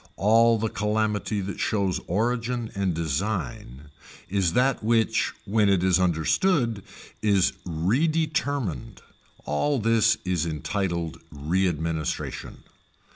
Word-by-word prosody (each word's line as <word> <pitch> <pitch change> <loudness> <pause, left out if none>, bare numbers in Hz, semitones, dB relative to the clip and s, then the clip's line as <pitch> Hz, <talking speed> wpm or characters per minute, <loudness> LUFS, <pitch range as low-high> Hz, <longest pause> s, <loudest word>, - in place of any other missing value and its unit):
All 115 +3 +4
the 110 +1 -1
calamity 105 0 -1
that 95 +1 -5
shows 100 -4 0
origin 115 +4 -1
and 95 -4 -1
design 75 - -3 0.4
is 95 -4 +1
that 125 0 +2
which 110 -1 +2
when 105 0 +2
it 95 -2 +2
is 95 -1 +3
understood 100 - +1 0.4
is 100 -4 +3
redetermined 140 - -1 0.4
all 140 - 0
this 115 -1 +3
is 90 -4 0
entitled 85 0 -3
readministration. 80 0 -2
100 Hz, 100 wpm, -25 LUFS, 85-115 Hz, 0.4 s, All